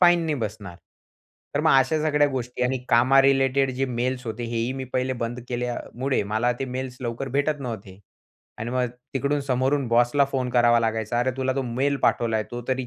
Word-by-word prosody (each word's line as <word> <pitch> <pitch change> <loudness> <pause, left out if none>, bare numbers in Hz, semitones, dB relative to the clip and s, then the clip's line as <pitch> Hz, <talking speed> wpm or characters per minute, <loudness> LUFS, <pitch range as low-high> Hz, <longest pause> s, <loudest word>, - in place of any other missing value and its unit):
Fine 175 -1 +6
नाही 155 - 0
बसणार. 105 -5 -5 0.8
तर - - +2
मग - - +3
अशा 135 +4 +2
सगळ्या 150 -1 +3
गोष्टी 125 -2 -4
आणि 130 +1 +1
कामा 125 +3 +5
रिलेटेड 135 0 +3
जे 135 +1 0
मेल्स 125 +1 -2
होते 115 +2 -4
हे, 115 0 -4
ही 115 +3 -1
मी 135 0 -5
पहिले 130 0 +1
बंद 120 +2 -3
केल्यामुळे, 125 +2 -2
मला 110 +4 0
ते - - 0
मेल्स 130 0 -5
लवकर 120 +2 -4
भेटत 145 +1 +1
नव्हते. 105 -7 -7 0.6
आणि 115 +1 -4
मग 125 0 +1 0.3
तिकडून 140 +2 0
समोरून 135 +1 +1
बॉसला 120 +4 +4
फोन 130 -2 -1
करावा 120 -1 +4
लागायचा 110 0 -1
अरे, 130 +2 +1
तुला 130 0 0
तो 135 - +1
मेल 130 +4 0
पाठवलाय 115 -2 +2
तो 120 0 -5
तरी 130 -1 -1
125 Hz, 190 wpm, -24 LUFS, 120-135 Hz, 0.8 s, Fine